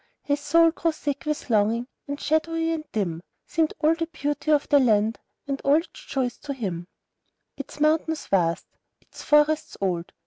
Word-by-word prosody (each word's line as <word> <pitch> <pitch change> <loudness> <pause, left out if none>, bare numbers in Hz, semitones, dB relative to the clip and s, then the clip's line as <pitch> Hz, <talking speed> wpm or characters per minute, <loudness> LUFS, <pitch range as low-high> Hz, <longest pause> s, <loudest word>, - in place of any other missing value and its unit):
His 285 0 0
soul 330 +3 +4
grew 330 0 0
sick 290 0 -4
with 300 0 -2
longing, 220 +3 +2 0.2
and 285 0 -4
shadowy 325 +1 0
and 315 -2 -4
dim 175 -7 -2 0.2
Seemed 320 -1 0
all 310 +1 +4
the 330 0 -3
beauty 295 -2 -3
of 295 -2 +3
the 290 - +5
land, 220 -3 +2 0.3
and 275 -1 -3
all 280 +1 +5
its 325 +2 0 0.2
joys, 255 -3 -2
to 280 -1 -5
him, 180 -8 -4 0.7
Its 280 +1 -9
mountains 310 +1 +1
vast, 170 -4 +1 0.3
its - - -14
forests 300 +1 +2
old. 175 -3 -2
290 Hz, 170 wpm, -25 LUFS, 225-315 Hz, 0.7 s, the